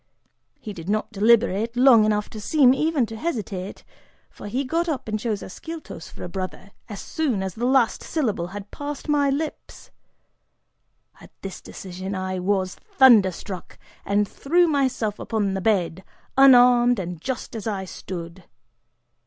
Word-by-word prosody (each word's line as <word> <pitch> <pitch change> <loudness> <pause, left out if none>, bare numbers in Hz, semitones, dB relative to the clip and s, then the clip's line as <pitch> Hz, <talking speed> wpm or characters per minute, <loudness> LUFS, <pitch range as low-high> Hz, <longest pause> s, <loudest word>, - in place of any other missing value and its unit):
He 215 - -7
did 170 0 -8
not 215 +2 -1
deliberate 225 +1 +2
long 245 -4 +7
enough 210 -1 0
to 215 - -8
seem 265 +1 +4
even 305 -2 +1
to 225 0 -8
hesitate, 210 - -4 0.5
for - - -10
he 255 +7 -1
got 335 +6 -1
up 285 -7 -3
and 215 0 -2
chose 215 -2 -3
Ascyltos 320 - -9
for - - -10
a - - -4
"brother," 190 +2 -6 0.2
as 205 - -7
soon 265 -12 -2
as 190 -2 -4
the 240 +5 -2
last 255 -4 +2
syllable 215 - -2
had 200 +2 -9
passed 290 +1 -6
my 290 -2 +2
lips! 300 +3 -5 1.3
At - - -14
this 195 -1 -7
decision 190 +1 -7
I 185 0 -3
was 185 0 0
thunder 235 -8 +5
struck, 185 0 -9 0.3
and 205 +1 +1
threw 345 - +2
myself 260 -8 0
upon 205 -4 -1
the 190 - -2
bed, 190 -4 0 0.3
unarmed 245 -2 +6
and 180 -3 -5
just 255 +2 -5
as 220 -1 -5
I 195 -3 -2
stood. 175 -1 -8
215 Hz, 155 wpm, -23 LUFS, 190-260 Hz, 1.3 s, long